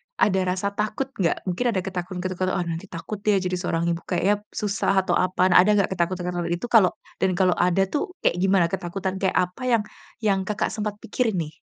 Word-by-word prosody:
ada 190 Hz, -2 st, +3 dB
rasa 190 Hz, +2 st, -1 dB
takut 215 Hz, +6 st, -2 dB
nggak? 175 Hz, -3 st, +1 dB
Mungkin 185 Hz, +7 st, -2 dB
ada 185 Hz, -, +1 dB
ketakutan-ketakutan, 185 Hz, 0 st, -3 dB
"Oh, 175 Hz, -, 0 dB
nanti 170 Hz, +2 st, -4 dB
takut 185 Hz, +4 st, -6 dB
deh 210 Hz, -1 st, +4 dB
jadi 180 Hz, 0 st, -1 dB
seorang 170 Hz, -2 st, -1 dB
ibu 170 Hz, -, -2 dB
kayaknya 195 Hz, +3 st, +1 dB, 0.2 s
susah," 200 Hz, -2 st, +1 dB
atau -, -, +1 dB
apaan 185 Hz, 0 st, +2 dB
ada 185 Hz, +4 st, +6 dB
nggak-nggak 200 Hz, -2 st, +2 dB
ketakutan-ketakutan 175 Hz, -1 st, -1 dB
itu 175 Hz, +8 st, -3 dB
kalau 205 Hz, -6 st, +6 dB, 0.3 s
dan 190 Hz, -, +2 dB
kalau 180 Hz, -1 st, +3 dB
ada 180 Hz, +2 st, +3 dB
tuh 300 Hz, +5 st, -2 dB
kayak -, -, +2 dB
gimana 190 Hz, -1 st, +3 dB
ketakutan 190 Hz, +1 st, -3 dB
kayak 190 Hz, -1 st, 0 dB
apa 180 Hz, +6 st, 0 dB
yang 230 Hz, -3 st, +3 dB, 0.4 s
yang 200 Hz, -3 st, +3 dB
Kakak 210 Hz, -, -1 dB
sempat 210 Hz, -1 st, -3 dB
pikirin 225 Hz, -1 st, 0 dB
nih? 160 Hz, -3 st, -3 dB
185 Hz, 195 wpm, -24 LUFS, 180-200 Hz, 0.4 s, ada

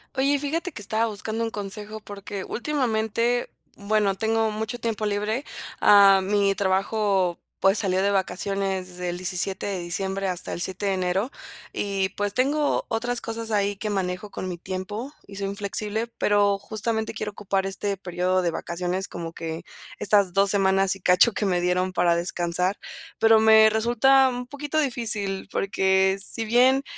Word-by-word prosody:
Oye, 275 Hz, +2 st, +2 dB
fíjate 325 Hz, +6 st, -2 dB
que 210 Hz, -, -7 dB
estaba 220 Hz, +3 st, 0 dB
buscando 220 Hz, +1 st, -4 dB
un 225 Hz, -1 st, -1 dB
consejo, 210 Hz, +1 st, -5 dB
porque 205 Hz, -1 st, -7 dB
últimamente, 235 Hz, -3 st, -1 dB, 0.3 s
bueno, 205 Hz, -1 st, +1 dB
tengo 220 Hz, +1 st, +1 dB
mucho 220 Hz, +3 st, -4 dB
tiempo 225 Hz, -2 st, -2 dB
libre. 210 Hz, +6 st, -1 dB, 0.3 s
Ah, 200 Hz, -1 st, +7 dB
mi 200 Hz, +1 st, +2 dB
trabajo, 195 Hz, -1 st, +1 dB, 0.2 s
pues, 195 Hz, +2 st, +4 dB
salió 190 Hz, -2 st, +1 dB
de 200 Hz, +1 st, +2 dB
vacaciones 195 Hz, 0 st, -1 dB
desde 180 Hz, 0 st, -5 dB
el 175 Hz, -, -3 dB
17 185 Hz, +2 st, -2 dB
de 195 Hz, -2 st, -2 dB
diciembre 190 Hz, +3 st, -2 dB
hasta 180 Hz, -1 st, -3 dB
el -, -, -4 dB
7 190 Hz, +3 st, -3 dB
de 195 Hz, -, +2 dB
enero 185 Hz, +6 st, -1 dB, 0.4 s
y, 195 Hz, -1 st, -1 dB
pues 205 Hz, 0 st, -1 dB
tengo, 285 Hz, +5 st, +1 dB
otras 240 Hz, +2 st, -1 dB
cosas 225 Hz, 0 st, -5 dB
ahí 205 Hz, -1 st, +1 dB
que 210 Hz, +2 st, -3 dB
manejo 190 Hz, +1 st, -3 dB
con 185 Hz, -, -5 dB
mi 175 Hz, -, -5 dB
tiempo 205 Hz, -, -5 dB
y 200 Hz, -, -11 dB
soy 200 Hz, 0 st, -2 dB
inflexible, 205 Hz, +3 st, -3 dB
pero 205 Hz, -1 st, +3 dB
justamente 220 Hz, +2 st, -3 dB
quiero 210 Hz, -1 st, -4 dB
ocupar 195 Hz, -1 st, -2 dB
este 200 Hz, +1 st, -2 dB
periodo 185 Hz, 0 st, 0 dB
de 175 Hz, -, +1 dB
vacaciones, 180 Hz, +3 st, -3 dB
como 165 Hz, -1 st, -6 dB
que 165 Hz, -1 st, -6 dB, 0.4 s
estas 200 Hz, -3 st, +2 dB
2 195 Hz, +1 st, +3 dB
semanas 195 Hz, -1 st, +2 dB
y 195 Hz, -, -14 dB
cacho 180 Hz, +6 st, +5 dB
que 210 Hz, -, -1 dB
me 180 Hz, -3 st, +1 dB
dieron 180 Hz, +1 st, 0 dB
para 175 Hz, -1 st, +3 dB
descansar. 175 Hz, +2 st, -1 dB, 0.4 s
Pero 225 Hz, 0 st, +6 dB
me 220 Hz, 0 st, +7 dB
resulta 240 Hz, +5 st, +4 dB
un 250 Hz, -1 st, -4 dB
poquito 290 Hz, +3 st, -4 dB
difícil, 215 Hz, -8 st, -1 dB
porque 190 Hz, 0 st, +2 dB
si 225 Hz, +3 st, -1 dB
bien, 255 Hz, +4 st, +4 dB
200 Hz, 165 wpm, -25 LUFS, 190-220 Hz, 0.4 s, Ah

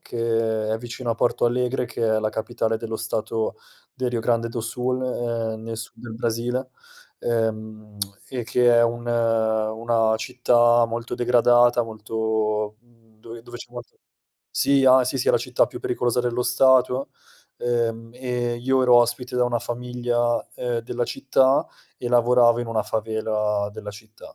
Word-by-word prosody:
che 115 Hz, -2 st, -1 dB
è 110 Hz, -, -1 dB
vicino 120 Hz, +1 st, -5 dB
a -, -, +1 dB
Porto 120 Hz, -, +1 dB
Alegre, 125 Hz, +1 st, 0 dB
che 120 Hz, 0 st, -6 dB
è -, -, +2 dB
la 110 Hz, 0 st, -1 dB
capitale 110 Hz, 0 st, -2 dB
dello 110 Hz, -1 st, -4 dB
stato 110 Hz, 0 st, -2 dB, 0.4 s
del 130 Hz, -1 st, -2 dB
Rio 120 Hz, -2 st, -2 dB
Grande 115 Hz, 0 st, 0 dB
do 115 Hz, -1 st, -4 dB
Sul, 125 Hz, +3 st, -2 dB
ehm, 115 Hz, -3 st, -3 dB
nel 115 Hz, 0 st, -5 dB
sud 115 Hz, +1 st, -9 dB
del 115 Hz, -2 st, -7 dB
Brasile, 120 Hz, +3 st, -2 dB, 0.5 s
ehm, 110 Hz, -2 st, -3 dB, 0.3 s
e, 125 Hz, -2 st, -3 dB
che 120 Hz, +1 st, +3 dB
è 115 Hz, -, +5 dB
un 120 Hz, +1 st, -1 dB
una 115 Hz, -1 st, +1 dB
città 120 Hz, -1 st, +3 dB
molto 115 Hz, +1 st, -4 dB
degradata, 120 Hz, 0 st, +4 dB
molto 110 Hz, -1 st, -2 dB
mhmm 115 Hz, -2 st, -29 dB
dove 115 Hz, 0 st, -10 dB
dove 120 Hz, 0 st, -10 dB
c'è 120 Hz, -, -11 dB
molto 120 Hz, 0 st, -11 dB, 0.5 s
sì, 140 Hz, -1 st, +2 dB
a 130 Hz, 0 st, +7 dB
sì, 130 Hz, +2 st, -2 dB
sì -, -, 0 dB
è -, -, +7 dB
la -, -, +4 dB
città -, -, +1 dB
più -, -, -9 dB
pericolosa 125 Hz, 0 st, 0 dB
dello 120 Hz, 0 st, -1 dB
stato; 130 Hz, +1 st, +3 dB, 0.5 s
ehm, 115 Hz, -1 st, -1 dB
e 125 Hz, -1 st, -2 dB
io 130 Hz, +2 st, +1 dB
ero 125 Hz, -1 st, +6 dB
ospite 120 Hz, +1 st, +1 dB
da 125 Hz, -, +3 dB
una 120 Hz, -1 st, 0 dB
famiglia, 120 Hz, 0 st, -1 dB
ehm, 120 Hz, -1 st, -2 dB
della 120 Hz, +1 st, -3 dB
città 135 Hz, +2 st, +2 dB, 0.3 s
e 120 Hz, -, -4 dB
lavoravo 120 Hz, 0 st, +4 dB
in 120 Hz, -, -4 dB
una 115 Hz, -1 st, -1 dB
favela 105 Hz, -1 st, -1 dB
della 105 Hz, 0 st, -7 dB
città 110 Hz, +2 st, -14 dB
120 Hz, 165 wpm, -23 LUFS, 110-125 Hz, 0.5 s, a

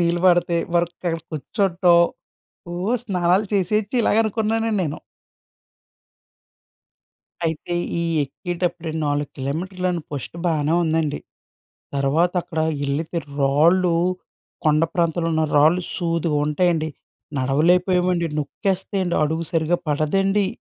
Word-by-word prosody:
నీళ్లు 170 Hz, 0 st, +1 dB
పడితే 175 Hz, -1 st, +3 dB, 0.2 s
వరదకక్కడ 170 Hz, -1 st, 0 dB
కూర్చోటం. 175 Hz, +3 st, +2 dB, 0.7 s
ఓహ్! 185 Hz, +7 st, -1 dB
స్నానాలు 185 Hz, 0 st, +1 dB
చేసేయొచ్చు, 205 Hz, +4 st, 0 dB
ఇలాగ 210 Hz, -, +2 dB
అనుకున్నానండి 220 Hz, +1 st, 0 dB
నేను. 150 Hz, -3 st, -3 dB, 2.5 s
అయితే 160 Hz, +2 st, -3 dB, 0.3 s
ఈ -, -, 0 dB, 0.2 s
ఎక్కేటప్పుడే 175 Hz, +2 st, -4 dB, 0.2 s
4 145 Hz, 0 st, -1 dB
కిలోమీటర్లని 180 Hz, +6 st, -2 dB
ఫస్ట్ 145 Hz, +2 st, -6 dB
బానే 160 Hz, -2 st, +1 dB
ఉందండి. 160 Hz, -2 st, 0 dB, 0.8 s
తర్వాత 145 Hz, +6 st, +2 dB
అక్కడ 160 Hz, -2 st, -4 dB, 0.3 s
ఎళ్ళితే 155 Hz, +5 st, -2 dB, 0.2 s
రాళ్ళూ, 170 Hz, +6 st, +4 dB, 0.7 s
కొండ 155 Hz, 0 st, +3 dB
ప్రాంతంలో 170 Hz, -1 st, +1 dB
ఉన్న 160 Hz, -, +2 dB
రాళ్ళు 160 Hz, +5 st, +5 dB
సూదుగుంటాయండి. 165 Hz, -1 st, +1 dB, 0.5 s
నడవలేకపోయామండి, 175 Hz, +6 st, +2 dB
నొక్కేస్తాయండి. 190 Hz, +3 st, -1 dB
అడుగు 160 Hz, +2 st, 0 dB
సరిగ్గా 165 Hz, +1 st, +1 dB
పడదండి. 195 Hz, +7 st, +1 dB
170 Hz, 95 wpm, -22 LUFS, 155-180 Hz, 2.5 s, రాళ్ళు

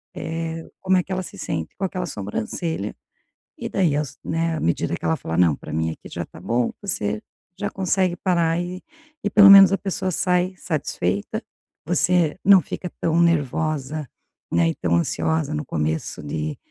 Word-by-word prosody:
eh, 165 Hz, 0 st, -4 dB
como 190 Hz, 0 st, +3 dB
é 180 Hz, -, +2 dB
que 190 Hz, -, -12 dB
ela 185 Hz, -, -1 dB
se -, -, -10 dB
sente 80 Hz, -1 st, -4 dB
com -, -, -5 dB
aquela 180 Hz, -1 st, -3 dB
sobrancelha. 105 Hz, -, -3 dB, 0.6 s
E -, -, -4 dB
daí 170 Hz, -7 st, +2 dB
aos, 150 Hz, -2 st, -3 dB
né, 165 Hz, 0 st, -1 dB
à -, -, -3 dB
medida 85 Hz, -, 0 dB
que -, -, -11 dB
ela 80 Hz, -, +2 dB
fala: 80 Hz, +1 st, -4 dB
"Não, 85 Hz, -5 st, +4 dB
pra -, -, -10 dB
mim 80 Hz, 0 st, 0 dB
aqui -, -, -10 dB
já -, -, -3 dB
tá -, -, -14 dB
bom.", 120 Hz, 0 st, 0 dB
você 105 Hz, -, -2 dB, 0.4 s
já 205 Hz, -, -1 dB
consegue 185 Hz, -1 st, +1 dB
parar 170 Hz, -3 st, +1 dB
e 180 Hz, +1 st, -5 dB, 0.4 s
e 205 Hz, -, +1 dB
pelo 200 Hz, -1 st, +8 dB
menos 195 Hz, -1 st, +10 dB
a 195 Hz, -, +2 dB
pessoa 190 Hz, -1 st, -2 dB
sai 180 Hz, +1 st, +1 dB
satisfeita, 100 Hz, -, -2 dB, 0.4 s
você 175 Hz, -1 st, +2 dB
não 195 Hz, -2 st, +8 dB
fica 180 Hz, +5 st, -6 dB
tão 165 Hz, 0 st, +2 dB
nervosa, 155 Hz, -2 st, 0 dB, 0.4 s
né, 85 Hz, -1 st, +3 dB
e -, -, -2 dB
tão 85 Hz, -1 st, 0 dB
ansiosa 155 Hz, -, 0 dB
no 150 Hz, -, -3 dB
começo 80 Hz, -6 st, -2 dB
de 75 Hz, +1 st, -3 dB
160 Hz, 180 wpm, -23 LUFS, -, 0.6 s, menos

